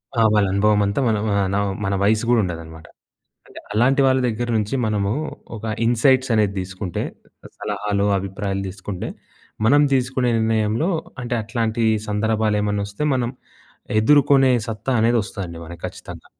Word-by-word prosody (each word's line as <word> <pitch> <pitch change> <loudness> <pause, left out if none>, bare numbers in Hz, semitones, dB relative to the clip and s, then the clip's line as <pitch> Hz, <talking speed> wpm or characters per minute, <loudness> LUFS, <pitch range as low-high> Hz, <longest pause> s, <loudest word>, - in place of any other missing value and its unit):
ఆ! 115 - +2
వాళ్ళ 105 -1 +4
అనుభవమంతా 100 +2 +2
మన 110 -2 +2 0.4
నా - - +2 0.3
మన 100 - 0
వయస్సు 105 +2 +2
గూడా 120 -1 +4
ఉండదనమాట. 80 -2 -6 0.6
అంటే - - -11
అలాంటి 125 +6 +3
వాళ్ళ 130 0 +3
దగ్గర 120 +1 -2
నుంచి 105 +4 -1
మనము 105 -2 0 0.4
ఒక 110 - -10 0.2
ఇన్‌సైట్స్ 130 +2 +3
అనేది 105 -2 +2
దీసుకుంటే 95 -1 -4 0.6
సలహాలు, 105 -1 -1
అభిప్రాయాలు 95 0 -3
దీసుకుంటే 95 0 -6 0.6
మనం 145 +6 +5
తీసుకునే 125 -1 +1
నిర్ణయంలో 110 - +1 0.3
అంటే 120 0 -2
అట్లాంటి 115 0 -1 0.3
సందర్భాలు 110 0 +1
ఏమన్నొస్తే 100 +4 -2
మనం 125 -2 0 0.7
ఎదుర్కొనే 135 +1 +5 0.2
సత్తా 115 +4 -3
అనేది 115 +1 +3
వస్తదండి 85 -5 -7
మనకి 85 0 -11
ఖచ్చితంగా. - - -10
110 Hz, 130 wpm, -21 LUFS, 100-120 Hz, 0.7 s, మనం